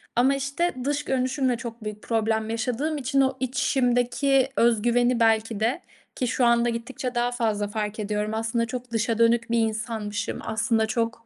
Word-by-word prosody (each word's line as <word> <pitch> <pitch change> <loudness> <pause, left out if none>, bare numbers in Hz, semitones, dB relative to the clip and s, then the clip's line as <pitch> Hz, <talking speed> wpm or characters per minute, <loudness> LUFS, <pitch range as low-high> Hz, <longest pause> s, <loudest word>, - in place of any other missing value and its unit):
ama, 260 +3 +4
işte, 280 +6 -1
dış 290 +2 -1
görünüşümle 260 -1 0
çok 235 -2 -8
büyük 210 0 -6
problem 220 -1 0
yaşadığım 250 +7 -1
için 275 0 +1
o 265 0 +1
içimdeki 260 +1 +1
öz 230 -2 +3
güveni 240 +1 +2
belki 225 -1 +2
de 235 +10 0 0.3
ki 250 - -1
şu 250 0 +1
anda 235 0 +3
gittikçe 245 +2 -4
daha 240 0 +1
fazla 220 -4 -1
fark 210 +1 -4
ediyorum, 210 0 -2
aslında 225 +1 0
çok 250 +1 -6
dışa 225 0 0
dönük 230 0 +3
bir 235 - +3
insanmışım, 220 -2 -2
aslında 220 0 0
çok 230 +1 -2
235 Hz, 165 wpm, -25 LUFS, 220-255 Hz, 0.3 s, ama